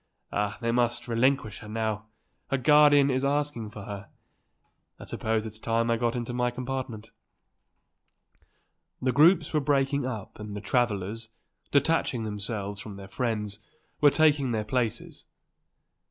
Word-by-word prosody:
Ah, 105 0 -1
they 115 0 0
must 120 0 0
relinquish 120 -2 +1
her 105 - -11
now; 110 -1 -2 0.4
her 135 - +1
guardian 145 +1 +6
is 130 +1 0
asking 140 -5 -1
for 105 -1 -9
her. 100 0 -7 0.9
I - - -9
suppose 110 0 -1
it's 110 0 -7
time 115 +1 +1
that - - +4
I - - 0
got 120 0 0
into 120 0 -3
my 125 0 +1
compartment." 125 -3 -5 1.9
The 130 - +1
groups 160 +3 +5
were 155 - +3
breaking 140 -1 +1
up 110 -6 -6
and 105 -1 -6
the - - -3
travellers, 110 -1 -1 0.4
detaching 140 -4 +2
themselves 105 -1 -4
from 105 -1 -8
their 100 -1 -9
friends, 105 -3 -2 0.4
were 145 - +7
taking 145 -4 +3
their 110 -1 -1
places. 115 -1 -3
115 Hz, 145 wpm, -27 LUFS, 105-135 Hz, 1.9 s, were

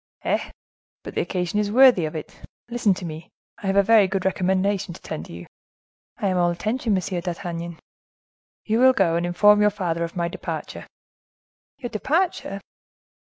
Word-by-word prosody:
"Eh! - - -1 0.5
but - - -8
the - - 0
occasion 180 +1 -2
is 205 -1 -1
worthy 245 -7 +6
of 155 - -5
it. 155 - -7 0.4
Listen 235 -4 +2
to 180 - -7
me. 160 0 -8 0.3
I 200 - -4
have 195 - +1
a 200 - +5
very 215 -1 +5
good 190 0 -2
recommendation 190 -1 0
to - - -13
tender 80 - -6
you." 85 +1 -9 0.7
"I 200 - -1
am 185 - 0
all 175 -1 +3
attention, 215 +6 -1
Monsieur 185 -1 -2
d'Artagnan." 170 -1 -5 0.9
"You 220 +1 +1
will 260 +1 +6
go 175 -7 +2
and 170 +1 0
inform 205 +4 +5
your 210 - +5
father 175 -5 -2
of 170 - -5
my 170 -1 0
departure." 170 - -6 0.9
"Your 250 -4 -6
departure?" 270 - -1
190 Hz, 170 wpm, -23 LUFS, 170-210 Hz, 0.9 s, worthy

